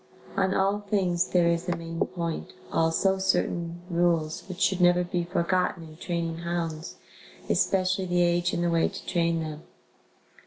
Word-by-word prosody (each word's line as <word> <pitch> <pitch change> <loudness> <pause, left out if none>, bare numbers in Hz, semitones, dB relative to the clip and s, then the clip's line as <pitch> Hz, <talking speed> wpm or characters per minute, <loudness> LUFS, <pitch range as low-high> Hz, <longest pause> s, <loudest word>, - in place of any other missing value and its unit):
On 190 0 +1
all 195 +2 +2
things 190 -4 0
there 175 -2 +3
is 170 +1 0
a 175 - +1
main 165 0 -6
point, 170 -2 -4 0.2
also 175 +4 +2
certain 175 -2 0
rules 170 -2 +1
which 185 0 -6
should 190 -2 +2
never 175 0 +5
be 175 0 -1
forgotten 175 0 0
in 155 - -13
training 170 -2 -3
hounds, 170 -1 -3 0.5
especially 190 0 +1
the 175 -1 +2
age 175 +1 +2
and 175 - -1
the 170 - +1
way 165 -1 +3
to 195 - -9
train 170 -2 +1
them. 155 -1 -5
175 Hz, 160 wpm, -27 LUFS, 170-185 Hz, 0.5 s, never